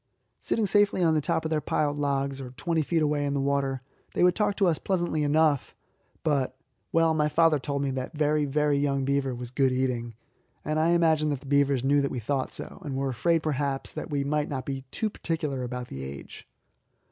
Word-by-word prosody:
Sitting 225 Hz, -, 0 dB
safely 205 Hz, -2 st, +3 dB
on 165 Hz, -2 st, +4 dB
the 155 Hz, -, +2 dB
top 160 Hz, +3 st, -1 dB
of 160 Hz, -, -2 dB
their 155 Hz, -1 st, +1 dB
piled 145 Hz, 0 st, 0 dB
logs, 140 Hz, -1 st, -1 dB
or 130 Hz, -, -7 dB
twenty 165 Hz, -2 st, 0 dB
feet 160 Hz, +1 st, +1 dB
away 150 Hz, -1 st, +1 dB
in 140 Hz, 0 st, -1 dB
the -, -, 0 dB
water, 135 Hz, -1 st, 0 dB, 0.3 s
they -, -, +3 dB
would 180 Hz, 0 st, +6 dB
talk 205 Hz, 0 st, 0 dB
to 200 Hz, -, +2 dB
us 170 Hz, -4 st, +2 dB
pleasantly 175 Hz, -5 st, 0 dB
enough; 150 Hz, -1 st, +2 dB, 0.5 s
but 135 Hz, -4 st, 0 dB, 0.3 s
well, 165 Hz, -1 st, +3 dB
my 150 Hz, -1 st, +2 dB
father 160 Hz, -1 st, +4 dB
told 140 Hz, +1 st, -2 dB
me 140 Hz, -, 0 dB
that 130 Hz, +4 st, -5 dB
young, 150 Hz, -1 st, +2 dB
very 145 Hz, 0 st, +2 dB
young, 140 Hz, -1 st, 0 dB
beaver 135 Hz, -2 st, 0 dB
was 120 Hz, 0 st, -7 dB
good 135 Hz, 0 st, +2 dB
eating, 125 Hz, -3 st, -1 dB, 0.5 s
and 155 Hz, +1 st, 0 dB
I 160 Hz, +2 st, +3 dB
imagine 160 Hz, -3 st, +3 dB
that 140 Hz, -3 st, -2 dB
the -, -, -15 dB
beavers 140 Hz, -2 st, +2 dB
knew 140 Hz, +1 st, +3 dB
that 140 Hz, -, 0 dB
we -, -, -4 dB
thought 130 Hz, +4 st, -2 dB
so, -, -, -8 dB
and 140 Hz, -4 st, -4 dB
were 135 Hz, 0 st, -1 dB
afraid, 165 Hz, +6 st, +1 dB
perhaps, 140 Hz, -2 st, -1 dB
that -, -, -6 dB
we 145 Hz, -1 st, 0 dB
might 150 Hz, +1 st, 0 dB
not 130 Hz, -2 st, -4 dB
be 135 Hz, -1 st, -4 dB
too 220 Hz, -, -1 dB
particular 155 Hz, -8 st, -2 dB
about 125 Hz, 0 st, -5 dB
the 70 Hz, -, -6 dB
age. 70 Hz, +1 st, -9 dB
145 Hz, 215 wpm, -27 LUFS, 135-155 Hz, 0.5 s, would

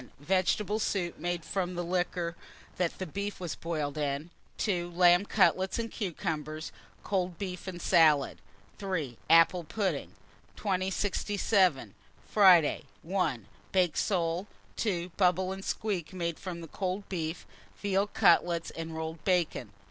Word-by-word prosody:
Vegetable 190 Hz, +6 st, +1 dB
soup, 185 Hz, -5 st, -1 dB
made 175 Hz, 0 st, -2 dB
from 185 Hz, -2 st, -2 dB
liquor 175 Hz, -1 st, -1 dB, 0.4 s
that 180 Hz, -1 st, -2 dB
beef 200 Hz, +1 st, -3 dB
was 175 Hz, -3 st, -3 dB
boiled 155 Hz, -3 st, -3 dB
in. 145 Hz, +3 st, -2 dB, 0.3 s
2. 175 Hz, -5 st, -1 dB
Lamb 175 Hz, +2 st, +5 dB
cutlets 190 Hz, -2 st, +3 dB
and 230 Hz, -1 st, -3 dB
cucumbers, 155 Hz, -5 st, -4 dB, 0.3 s
cold 185 Hz, -3 st, -1 dB
beef 185 Hz, 0 st, -5 dB
and 180 Hz, -2 st, -5 dB
salad. 160 Hz, -6 st, +4 dB, 0.4 s
3. 165 Hz, -, -3 dB
Apple 165 Hz, +2 st, +6 dB
pudding. 185 Hz, -2 st, -2 dB, 0.4 s
2067. 190 Hz, -, +1 dB, 0.3 s
Friday. 185 Hz, -7 st, +5 dB, 0.2 s
1. 165 Hz, -, -1 dB, 0.3 s
Baked 180 Hz, -4 st, +2 dB
soles. 175 Hz, -1 st, 0 dB, 0.3 s
2. 180 Hz, -5 st, -1 dB
Bubble 185 Hz, 0 st, +2 dB
and 190 Hz, 0 st, -6 dB
squeak, 195 Hz, -6 st, -2 dB
made 170 Hz, -3 st, -3 dB
from 175 Hz, -3 st, -6 dB
cold 190 Hz, +3 st, -3 dB
beef; 165 Hz, -3 st, -4 dB, 0.3 s
veal 200 Hz, 0 st, +1 dB
cutlets 170 Hz, -3 st, +3 dB
and 165 Hz, 0 st, -6 dB
rolled 160 Hz, -1 st, -5 dB
bacon. 170 Hz, -, 0 dB
180 Hz, 120 wpm, -30 LUFS, 165-190 Hz, 0.4 s, Apple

